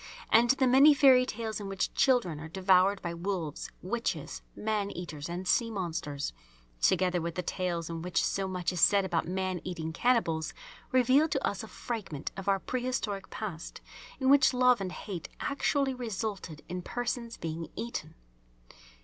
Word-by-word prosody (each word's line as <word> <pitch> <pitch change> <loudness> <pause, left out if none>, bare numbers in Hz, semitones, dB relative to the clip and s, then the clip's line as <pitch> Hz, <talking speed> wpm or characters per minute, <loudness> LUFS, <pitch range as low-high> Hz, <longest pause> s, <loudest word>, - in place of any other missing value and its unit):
And 235 +2 +6
the 265 +1 +4
many 275 +4 +7
fairy 260 -3 +6
tales 220 -1 -4
in 205 - -6
which 195 -1 -2
children 240 - +2
are 155 - -7
devoured 190 +2 +3
by 170 - -3
wolves, 170 -3 -3
witches, 230 +6 -3
man 210 -2 -1
eaters, 170 -5 -6
and 180 +2 -4
sea 230 +3 +3
monsters, 165 -8 -3 0.5
together 180 -1 +3
with 170 0 -4
the 180 - -2
tales 175 -3 -2
in 165 -1 -5
which 180 +2 0
so 195 -1 -1
much 180 -1 -2
is 180 - -2
said 200 -2 +5
about 175 -4 -1
man 185 -1 -2
eating 160 -3 -4
cannibals, 170 -8 +1 0.4
reveal 260 +4 +4
to - - 0
us - - -3
a - - -8
fragment 205 - -5
of 195 0 -7
our 195 - +4
pre 250 +6 -3
historic 220 -6 -3
past 185 -7 -6 0.4
in 260 - 0
which 275 -2 +5
love 250 -3 +4
and 185 -2 -3
hate 180 -3 -6
actually 280 -1 0
resulted 215 -9 -5
in 180 +1 -4
persons 235 +2 -3
being 165 0 -4
eaten. 235 +1 -5
195 Hz, 165 wpm, -30 LUFS, 175-240 Hz, 0.5 s, many